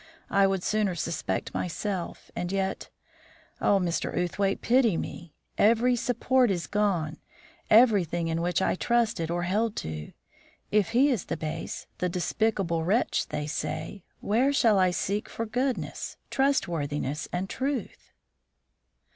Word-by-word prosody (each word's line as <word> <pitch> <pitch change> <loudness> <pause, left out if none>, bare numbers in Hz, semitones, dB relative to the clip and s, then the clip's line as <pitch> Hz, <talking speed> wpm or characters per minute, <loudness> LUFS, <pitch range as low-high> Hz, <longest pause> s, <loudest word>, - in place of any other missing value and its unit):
I 195 0 +5
would 195 -2 -1
sooner 210 -4 +1
suspect 165 -1 -3
myself, 180 +1 -4
and 175 0 -3
yet 195 -1 -2 0.7
oh, 200 - +4
Mr. 175 -3 -1
Outhwaite, 195 +3 0
pity 235 -7 +4
me! 170 -3 -6 0.2
Every 235 +3 +4
support 245 +1 +2
is 175 -5 -1
gone; 180 -6 0 0.5
everything 195 -8 +4
in 165 0 -1
which 175 +1 +1
I - - +2
trusted 215 -6 +1
or 175 +1 -1
held 210 +5 0
to. 80 -1 -6 0.6
If 210 -1 +3
he 275 +4 +5
is 230 -9 -1
the - - -3
base, 155 0 -5
the 180 - 0
despicable 180 -2 0
wretch 205 +9 +1
they 150 - -3
say, 155 +4 -4 0.2
where 245 +7 +2
shall 230 -8 +4
I 185 -1 +4
seek 200 +3 -2
for 230 - -4
goodness, 250 +3 -2
trustworthiness, 160 - 0
and 180 +2 -2
truth?" 270 +5 -4
195 Hz, 135 wpm, -27 LUFS, 170-230 Hz, 0.7 s, I